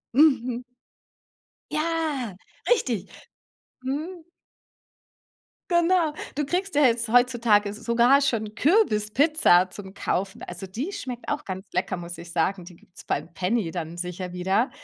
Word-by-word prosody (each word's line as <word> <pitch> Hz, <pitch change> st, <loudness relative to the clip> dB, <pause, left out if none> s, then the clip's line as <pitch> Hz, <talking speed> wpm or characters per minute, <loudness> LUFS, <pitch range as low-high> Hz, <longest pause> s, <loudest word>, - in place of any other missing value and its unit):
Mhm. 255 Hz, -5 st, +4 dB, 1.1 s
Ja, 305 Hz, -, -1 dB, 0.3 s
richtig. 240 Hz, -, +1 dB, 0.7 s
Mhm. 315 Hz, +6 st, -4 dB, 1.5 s
Genau. 345 Hz, -2 st, +3 dB, 0.2 s
Du 295 Hz, -1 st, 0 dB
kriegst 365 Hz, +3 st, -2 dB
ja 295 Hz, -, +5 dB
jetzt 235 Hz, -2 st, +3 dB
heutzutage 235 Hz, -4 st, +4 dB
s 210 Hz, -, -7 dB
sogar 240 Hz, +5 st, +4 dB
schon 220 Hz, -6 st, -1 dB
Kürbispizza 230 Hz, -, +3 dB
zum 195 Hz, -1 st, -10 dB
Kaufen. 190 Hz, +1 st, -2 dB
Also, 180 Hz, +2 st, -7 dB
die 250 Hz, -, -4 dB
schmeckt 250 Hz, -10 st, -6 dB
auch -, -, -2 dB
ganz 190 Hz, 0 st, -6 dB
lecker, 180 Hz, +1 st, -1 dB
muss 170 Hz, -1 st, -8 dB
ich 170 Hz, 0 st, -10 dB
sagen. 180 Hz, +2 st, 0 dB
Die 175 Hz, -, -12 dB
gibt's 180 Hz, +2 st, -16 dB
beim 160 Hz, +4 st, -3 dB
Penny 185 Hz, -1 st, 0 dB
dann 170 Hz, -1 st, -5 dB
sicher 180 Hz, 0 st, -5 dB
wieder. 190 Hz, +7 st, +1 dB
230 Hz, 130 wpm, -25 LUFS, 185-285 Hz, 1.5 s, ja